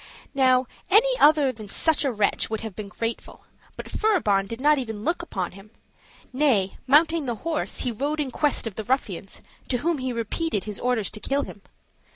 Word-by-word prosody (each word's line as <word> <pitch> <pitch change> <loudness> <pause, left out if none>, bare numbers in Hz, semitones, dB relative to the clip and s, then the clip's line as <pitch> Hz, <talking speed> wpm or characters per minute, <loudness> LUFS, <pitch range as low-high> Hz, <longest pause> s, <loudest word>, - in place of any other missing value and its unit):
Now, 260 -2 +4 0.2
any 460 +6 +5
other 295 -3 +5
than 220 -4 -10
such 315 +8 +3
a 275 - +1
wretch 210 -3 0
would 220 -1 -3
have 220 -4 -7
been 210 -2 -6
grateful, 230 +2 -5 0.3
but - - -6
Furibon 215 - +1
did 230 +2 -6
not 295 +1 +4
even 220 -4 -5
look 340 +5 0
upon 190 - -4
him; 195 +3 -14 0.6
nay, 250 -9 +1
mounting 310 +2 +4
the 240 - -1
horse, 325 -2 -1
he 250 - -1
rode 285 +7 -2
in 280 -3 -2
quest 295 0 0
of 220 -4 -6
the 220 - -3
ruffians, 205 -6 -2 0.3
to 250 - +1
whom 325 +4 -1
he 255 0 -2
repeated 230 - -2
his 210 -2 -6
orders 245 -5 0
to 215 - -7
kill 280 +5 -1
him. 205 - -10
255 Hz, 195 wpm, -25 LUFS, 215-300 Hz, 0.6 s, any